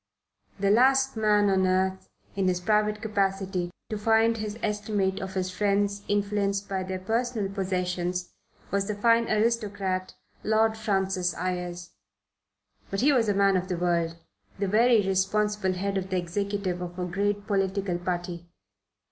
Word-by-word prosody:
The 200 Hz, 0 st, +2 dB
last 265 Hz, +4 st, +4 dB
man 210 Hz, -2 st, +3 dB
on 190 Hz, -1 st, +3 dB
earth, 190 Hz, 0 st, 0 dB, 0.3 s
in 195 Hz, -1 st, +1 dB
his 180 Hz, -1 st, +1 dB
private 210 Hz, +2 st, +1 dB
capacity, 195 Hz, -4 st, -1 dB, 0.2 s
to 215 Hz, -, -2 dB
find 225 Hz, +1 st, +3 dB
his 215 Hz, 0 st, -4 dB
estimate 210 Hz, -2 st, -1 dB
of 190 Hz, 0 st, -6 dB
his 185 Hz, -1 st, -1 dB
friends 200 Hz, +1 st, 0 dB
influenced 200 Hz, -1 st, 0 dB
by 190 Hz, -1 st, -2 dB
their 185 Hz, 0 st, -3 dB
personal 220 Hz, +1 st, -1 dB
possessions 180 Hz, -2 st, -2 dB, 0.4 s
was 200 Hz, 0 st, 0 dB
the 210 Hz, -, -2 dB
fine 230 Hz, +2 st, +3 dB
aristocrat 210 Hz, -4 st, 0 dB, 0.3 s
Lord 220 Hz, +1 st, +2 dB
Francis 190 Hz, -4 st, 0 dB
Ayres. 180 Hz, -1 st, -4 dB, 1.0 s
But 195 Hz, -, -2 dB
he 285 Hz, +3 st, +5 dB
was 230 Hz, -5 st, +2 dB
a 205 Hz, -, +2 dB
man 195 Hz, -1 st, +4 dB
of 185 Hz, 0 st, 0 dB
the 180 Hz, -, -2 dB
world, 170 Hz, -1 st, 0 dB, 0.4 s
the 200 Hz, 0 st, -1 dB
very 225 Hz, +1 st, +4 dB
responsible 195 Hz, +1 st, +1 dB
head 195 Hz, +1 st, -1 dB
of 190 Hz, 0 st, -6 dB
the 185 Hz, -, 0 dB
executive 185 Hz, +1 st, -2 dB
of 175 Hz, 0 st, -6 dB
a 180 Hz, -, -2 dB
great 200 Hz, +3 st, -1 dB
political 195 Hz, -2 st, 0 dB
party. 175 Hz, -1 st, -4 dB
195 Hz, 150 wpm, -27 LUFS, 185-210 Hz, 1.0 s, he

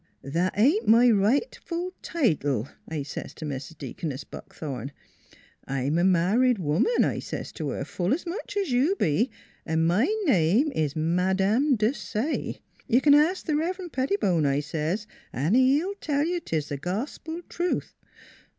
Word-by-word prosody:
That 170 Hz, +8 st, -1 dB
ain't 290 Hz, -, +3 dB
my 235 Hz, +2 st, +6 dB
rightful 335 Hz, -, 0 dB
title, 145 Hz, -, 0 dB, 0.2 s
I 155 Hz, -3 st, -3 dB
says 145 Hz, -, -7 dB
to 155 Hz, -, -7 dB
Mis 140 Hz, -2 st, -5 dB
Deaconess 145 Hz, -1 st, -6 dB
Buckthorn. 135 Hz, -3 st, -7 dB, 0.7 s
I 135 Hz, -1 st, -2 dB
am 145 Hz, +6 st, +1 dB
a -, -, +2 dB
married 195 Hz, +8 st, +3 dB
woman, 180 Hz, -, +2 dB
I -, -, -1 dB
says -, -, -6 dB
to -, -, -4 dB
her, -, -, -3 dB
full 180 Hz, +1 st, -2 dB
as 315 Hz, +7 st, 0 dB
much 410 Hz, +4 st, -5 dB
as 390 Hz, -8 st, 0 dB
you 270 Hz, +10 st, +3 dB
be, 215 Hz, -, +1 dB, 0.2 s
& -, -, -36 dB, 0.3 s
my 220 Hz, +9 st, +3 dB, 0.2 s
name 215 Hz, -, +3 dB
is 155 Hz, -, -1 dB
Madame 190 Hz, -, +2 dB
Desaye. 225 Hz, +4 st, -2 dB, 0.3 s
You 245 Hz, -, +4 dB
can 285 Hz, +1 st, +5 dB
ask 315 Hz, +6 st, +3 dB
the 310 Hz, -, 0 dB
Revrend 350 Hz, +3 st, -2 dB
Pettibone, 260 Hz, -, +1 dB
I 140 Hz, +1 st, +2 dB
says, 160 Hz, +7 st, -2 dB, 0.2 s
& 145 Hz, +7 st, -2 dB
he 260 Hz, +4 st, +5 dB
will 390 Hz, +2 st, -3 dB
tell 290 Hz, -1 st, 0 dB
you 350 Hz, +1 st, -1 dB
tis 155 Hz, -, -3 dB
gospel 275 Hz, -, -4 dB
truth. 350 Hz, +1 st, -2 dB
215 Hz, 155 wpm, -26 LUFS, -, 0.7 s, my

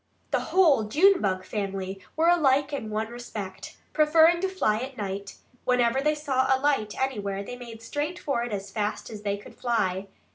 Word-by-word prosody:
The -, -, +2 dB
whole 315 Hz, -, +4 dB
Junebug 215 Hz, -, +3 dB
family 195 Hz, -2 st, -4 dB
were 320 Hz, +2 st, +3 dB
alike 290 Hz, -4 st, +3 dB
in 225 Hz, -6 st, -3 dB
one 215 Hz, +1 st, -2 dB
respect: 225 Hz, -5 st, -7 dB, 0.2 s
preferring 320 Hz, +2 st, +5 dB
to 385 Hz, -, 0 dB
fly 220 Hz, -, +1 dB
at 260 Hz, +2 st, -6 dB
night, 200 Hz, -1 st, -5 dB, 0.3 s
whenever 250 Hz, +1 st, +2 dB
they 300 Hz, +2 st, +2 dB
saw 270 Hz, -3 st, 0 dB
a 265 Hz, -, +5 dB
light 270 Hz, -7 st, +1 dB
anywhere 205 Hz, -7 st, -2 dB
they 245 Hz, -, -7 dB
made 235 Hz, -2 st, -10 dB
straight 295 Hz, +7 st, -3 dB
for 275 Hz, -8 st, -1 dB
it 240 Hz, -, -4 dB
as 195 Hz, -1 st, -4 dB
fast 210 Hz, +2 st, -3 dB
as 210 Hz, -2 st, -7 dB
they 200 Hz, -1 st, -1 dB
could 205 Hz, -, -13 dB
fly. 200 Hz, -6 st, -1 dB
240 Hz, 180 wpm, -26 LUFS, 205-290 Hz, 0.3 s, preferring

